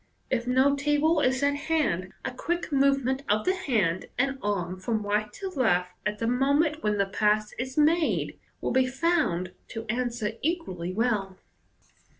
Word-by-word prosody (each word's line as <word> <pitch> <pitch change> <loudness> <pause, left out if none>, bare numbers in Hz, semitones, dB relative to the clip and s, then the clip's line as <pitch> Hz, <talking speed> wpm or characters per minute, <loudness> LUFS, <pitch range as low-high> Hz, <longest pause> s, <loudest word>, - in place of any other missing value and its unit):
If 245 -2 0
no 260 +3 +4
table 295 +3 +2
is 260 -1 +1
at 285 0 +3
hand 285 - 0
a 265 - -1
quick 340 +7 -3
movement 275 -1 +2
of 210 +1 +2
the 370 - +3
hand 210 - 0
and 270 +1 0
arm 185 -3 -2
from 215 +2 -2
right 210 +1 0
to 390 -1 -5
left, 180 - +1 0.2
at 210 0 -2
the 230 - -2
moment 285 +6 +2
when 210 -1 0
the 200 - +2
pass 210 +1 +1
is 260 +2 -4
made, 315 +2 +2 0.2
will - - -1
be 260 0 +3
found 265 - 0 0.2
to 225 0 -6
answer 235 -2 -1
equally 275 - -2
well. 200 -3 -1
250 Hz, 160 wpm, -27 LUFS, 210-285 Hz, 0.2 s, no